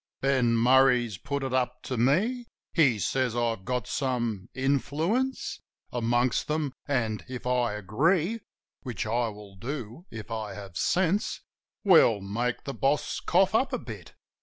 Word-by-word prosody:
Ben 130 -4 +2
Murray's 125 -4 +4
put 140 0 -3
it 130 -1 -3
up 125 -1 -1
to 130 - -3
me: 200 - +1 0.3
He 135 -9 +4
says 125 +5 0
I 120 -1 +1
got 115 +4 -3
some 120 -7 -2
influence 155 - 0 0.3
Amongst 120 +1 +1
them, 150 -3 -1
and 115 -7 -1
if 125 -1 -6
I 125 -3 +1
agree 160 - +1 0.2
— - - -67
"Which 120 -7 -4
I 115 +2 +1
will 105 -2 -10
do 125 - -6
if 115 0 -8
I 110 -3 -4
have 100 -3 -9
sense" 185 - +1 0.2
— - - -65
We'll 165 - +6
make 115 +5 -2
the 140 - -4
boss 140 +2 0
cough - - +3
up - - +2
a - - +1
bit. - - -10
125 Hz, 155 wpm, -28 LUFS, 115-140 Hz, 0.3 s, We'll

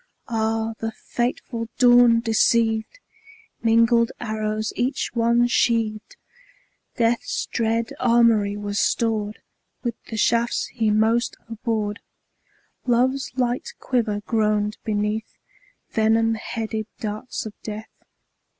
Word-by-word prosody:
Ah, 225 0 0
the 225 0 -2
fateful 240 0 -3
dawn 245 -2 +6
deceived! 225 - +2 0.6
Mingled 230 +1 +4
arrows 215 -1 -2
each 255 +4 -1
one 235 0 +3
sheaved; 225 -3 0 0.8
Death's 235 0 0
dread 230 0 -1
armoury 230 -4 +3
was 205 0 -2
stored 215 -2 0 0.4
With 240 -2 -1
the 225 - -6
shafts 235 +2 +2
he 225 -3 +1
most 225 +3 +2
abhorred; 220 -2 -2 0.9
Love's 255 +3 +2
light 245 0 -1
quiver 220 -5 -1
groaned 210 -1 0
beneath 210 0 -2 0.5
Venom 225 +1 +3
headed 220 -1 -4
darts 215 +3 -5
of 215 - -6
Death. 215 0 -7
225 Hz, 100 wpm, -23 LUFS, 215-235 Hz, 0.9 s, dawn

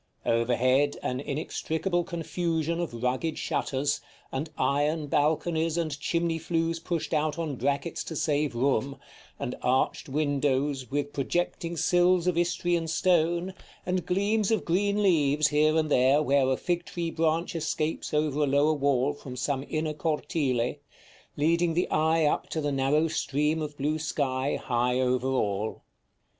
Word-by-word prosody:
Over 115 +1 +2
head 130 +4 +2
an 125 - -2
inextricable 160 +5 -2
confusion 170 -1 -2
of 125 -9 -4
rugged 130 +6 -1
shutters, 140 +1 -1 0.3
and 145 +4 -3
iron 150 +2 +1
balconies 160 +3 +1
and 155 -4 -2
chimney 165 +1 0
flues 165 0 -1
pushed 165 0 -3
out 155 0 0
on 160 -4 -2
brackets 140 +6 -1
to 160 - -6
save 150 -4 0
room, 135 +1 0 0.4
and 125 - -4
arched 130 +2 0
windows 140 -2 0
with 145 +1 -2
projecting 170 +3 -2
sills 175 +2 +3
of 180 -2 +1
Istrian 175 -1 0
stone, 170 +2 +1 0.3
and 180 -1 0
gleams 200 +3 +1
of 220 -4 +1
green 200 +4 +1
leaves 150 -5 +3
here 155 +1 +3
and 155 -1 0
there 130 +3 +5
where 140 -2 +3
a 130 - +1
fig 175 -1 -1
tree 170 -1 -3
branch 165 +2 0
escapes 155 0 -2
over 150 -1 0
a 145 - +3
lower 145 +3 +3
wall 140 -1 +1
from 135 -3 -9
some 135 +2 -1
inner 155 0 -1
cortile, 145 -5 -1 0.6
leading 165 +2 +2
the 175 - +1
eye 160 +1 +3
up 150 - 0
to 160 - -2
the 145 -1 -1
narrow 140 +4 +2
stream 150 +1 0
of 150 -1 -5
blue 150 +3 -1
sky 140 -3 -1
high 125 0 0
over 130 0 +1
all. 105 -5 -1
150 Hz, 150 wpm, -27 LUFS, 140-165 Hz, 0.6 s, there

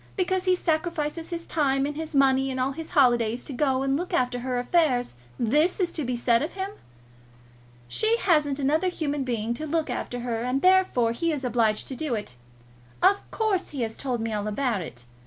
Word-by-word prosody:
Because 375 -1 0
he 370 0 +4
sacrifices 325 -1 -2
his 335 -1 -5
time 275 -3 +1
and 295 0 -3
his 315 -1 -5
money 270 -1 +4
and 260 -1 -3
all 260 +2 +1
his 320 +3 -7
holidays 240 -4 +2
to 280 - -6
go 265 0 +1
and 270 0 +1
look 355 +5 -2
after 250 -1 0
her 250 0 -2
affairs, 250 - +1 0.2
this 300 - +2
is 360 -2 +1
to 310 - -3
be 250 -1 -2
said 235 -1 +2
of 305 - -3
him! 385 +1 -4 1.2
She 440 - +2
hasn't 300 - +2
another 300 +6 +1
human 295 -5 -2
being 235 -2 -2
to 310 +6 -5
look 315 -3 -1
after 245 0 -4
her, 235 -2 -2
and, 250 +3 -1
therefore, 370 -11 +4
he 330 +8 -1
is 290 -3 -3
obliged 225 -3 +1
to 265 - -5
do 295 -4 -2
it. 205 - -6 0.7
Of 400 +1 +3
course 425 -5 -1
he 275 -5 -3
has 225 -1 -4
told 250 -4 -3
me 225 -1 -2
all 210 0 -2
about 220 -1 -1
it. 125 -7 -9
275 Hz, 205 wpm, -26 LUFS, 245-325 Hz, 1.2 s, he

